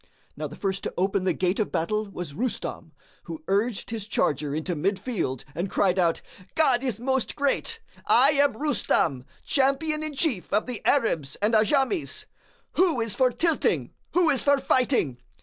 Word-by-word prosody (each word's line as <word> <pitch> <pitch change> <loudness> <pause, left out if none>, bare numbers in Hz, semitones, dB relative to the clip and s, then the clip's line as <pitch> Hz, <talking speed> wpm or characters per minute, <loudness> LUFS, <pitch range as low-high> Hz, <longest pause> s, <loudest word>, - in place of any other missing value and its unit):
Now 150 +1 -4
the 150 - -10
first 195 -1 -2
to - - -4
open 190 +1 0
the 185 - +3
gate 185 +4 0
of 215 - 0
battle 210 +5 -1
was 175 -6 -6
Rustam, 245 - -3 0.3
who 315 -1 -7
urged 210 +3 0
his 220 -3 -4
charger 145 -7 0
into 165 +3 -2
mid 195 +6 0
field 190 - -3
and 175 +5 -3
cried 190 -1 +2
out, 170 -2 +1 0.3
"God 265 -6 +3
is 250 -6 -2
most 265 0 -1
Great! 295 +11 -1 0.3
I 270 +5 +6
am 285 -1 +3
Rustam, 220 - 0 0.2
champion 300 +3 +1
in 310 -2 -4
chief 265 - 0
of 210 +2 +2
the 250 -3 -5
Arabs 165 - +1
and 210 +3 0
Ajams. 270 - +1 0.5
Who 340 -7 +3
is 225 -3 -1
for 255 +3 +3
tilting, 325 +5 0 0.2
who 350 -2 +4
is 270 - +2
for 285 0 +4
fighting? 250 - +1
225 Hz, 170 wpm, -26 LUFS, 185-275 Hz, 0.5 s, I